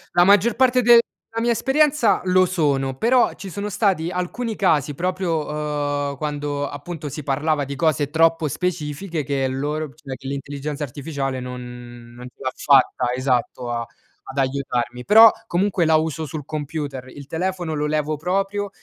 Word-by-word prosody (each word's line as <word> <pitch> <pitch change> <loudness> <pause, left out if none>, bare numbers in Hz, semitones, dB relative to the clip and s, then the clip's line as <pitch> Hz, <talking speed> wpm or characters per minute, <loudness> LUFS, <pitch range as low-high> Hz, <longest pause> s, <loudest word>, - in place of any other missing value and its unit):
La 175 - +6
maggior 205 +3 +4
parte 255 0 +3
de 235 0 +8 0.4
la 230 - 0
mia 240 - +1
esperienza, 270 -3 +2
lo 185 0 +4
sono, 140 -7 0
però 245 - +3
ci 195 - -9
sono 200 +4 -4
stati 190 -5 0
alcuni 210 +6 -3
casi 150 -7 +2
proprio, 180 0 -1
uhm, 145 -2 -2
quando, 145 -1 -3
appunto, 150 +1 -7
si 150 +2 -6
parlava 145 +2 0
di 140 +1 -5
cose 145 -1 +1
troppo 165 0 +3
specifiche 155 +1 -3
che 135 -1 -1
loro 145 +4 -2
p 140 - -19
cioè, 140 -4 -8
che 135 - -10
l'intelligenza 140 +2 -4
artificiale 135 -1 -4
non 120 -1 -9
non 125 +1 -9
ce 125 - -16
l'ha 130 - -1
fatta 130 -3 +3
esatto, 125 -1 -1
a 120 -1 -2 0.4
ad 135 - -9
aiutarmi. 130 -3 -1
Però, 220 - +9 0.2
comunque 185 -1 +1
la 160 0 +4
uso 160 0 0
sul 150 -1 -6
computer, 145 -3 -5
il 140 +2 -11
telefono 175 +1 -2
lo 150 0 -1
levo 155 0 0
proprio, 195 +5 -1
150 Hz, 165 wpm, -22 LUFS, 140-180 Hz, 0.4 s, Però